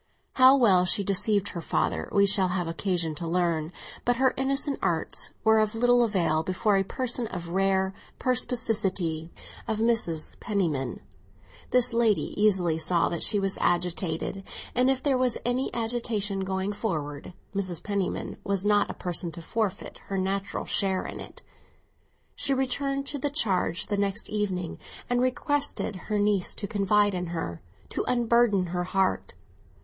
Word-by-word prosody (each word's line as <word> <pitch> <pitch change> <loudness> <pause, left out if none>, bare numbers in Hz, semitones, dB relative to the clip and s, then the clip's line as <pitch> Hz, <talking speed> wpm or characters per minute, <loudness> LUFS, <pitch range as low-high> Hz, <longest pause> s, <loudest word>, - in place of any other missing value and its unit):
How 260 +1 +7
well 195 -8 +5
she 185 +3 +2
deceived 200 +1 +1
her 170 - -6
father - - -1
we 200 -1 +4
shall 195 -1 +4
have 180 -1 -2
occasion 165 -1 -1
to 170 +2 -5
learn; 170 -2 0 0.3
but 245 - +2
her 260 +1 +2
innocent 275 +2 0
arts 170 -4 -1
were 220 0 +5
of 215 0 0
little 245 +1 +4
avail 175 -8 +1
before 185 +4 +1
a 195 - +3
person 245 +2 -2
of 180 -5 -6
the 170 - -8
rare 190 0 +1 0.2
perspicacity 200 -10 0 0.4
of 220 - -1
Mrs. 220 -8 +1
Penniman. 160 - -2 0.7
This 250 -1 +4
lady 230 -3 +2
easily 185 -6 +2
saw 170 +1 +2
that 170 - -3
she 210 - +5
was 195 -1 -1
agitated, 175 +1 -1 0.3
and 250 +1 +3
if 265 -1 0
there 270 -3 +2
was 255 -2 +1
any 245 +2 0
agitation 225 -4 -1
going 190 +1 -2
forward, 155 -8 -4 0.2
Mrs. 185 -4 -2
Penniman 200 -3 -2
was 195 -1 -1
not 205 0 +3
a - - -5
person 175 -1 -2
to 170 - -8
forfeit 205 0 -3
her 195 - -3
natural 195 +1 -2
share 190 -2 0
in - - -7
it. - - -11 0.9
She 275 - +3
returned 275 +1 -1
to 285 0 -4
the 290 - 0
charge 200 - +1
the 205 - -2
next 200 +2 -2
evening, 195 -5 -2 0.3
and 245 0 +2
requested 255 -3 -1
her 210 - +1
niece 205 -2 +1
to - - -4
lean 200 -1 +1
upon 205 -3 +3
her—to 95 - -6
unburden 235 -5 +3
her 175 0 -3
heart. 185 - 0
200 Hz, 155 wpm, -27 LUFS, 180-230 Hz, 0.9 s, How